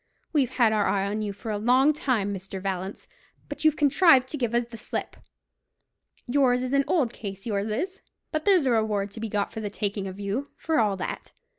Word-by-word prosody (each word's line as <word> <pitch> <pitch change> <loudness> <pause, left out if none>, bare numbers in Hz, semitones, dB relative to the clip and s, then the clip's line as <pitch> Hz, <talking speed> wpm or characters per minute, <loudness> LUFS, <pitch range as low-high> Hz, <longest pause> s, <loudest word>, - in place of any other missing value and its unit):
We've 275 -6 +3
had 235 -4 +3
our 210 -2 +2
eye 195 -1 +1
on 210 +2 -2
you 210 -1 -2
for 200 +3 -6
a 205 - -2
long 255 +7 +4
time, 235 -9 0
Mr. 195 0 -6
Vallance; 190 0 -4 0.4
but 290 +1 -6
you've 310 -1 +5
contrived 285 -2 +5
to 300 - -3
give 240 -3 -1
us 240 - +3
the 235 0 -11
slip. 225 - -5 1.1
Yours 250 -1 +2
is 255 +1 -3
an 275 0 +3
old 265 -10 +1
case, 195 -2 -7
yours 205 -2 -1
is; 365 - -3 0.3
but 310 -1 -1
there's 370 -6 +4
a 255 - +3
reward 210 -3 0
to 220 - -8
be 225 0 -4
got 205 -1 -1
for 220 - -5
the 210 - -3
taking 200 -1 -2
of 190 +1 -8
you, 210 +8 -3
for 320 -4 0
all 205 -3 +2
that. - - -5
225 Hz, 220 wpm, -26 LUFS, 200-275 Hz, 1.1 s, you've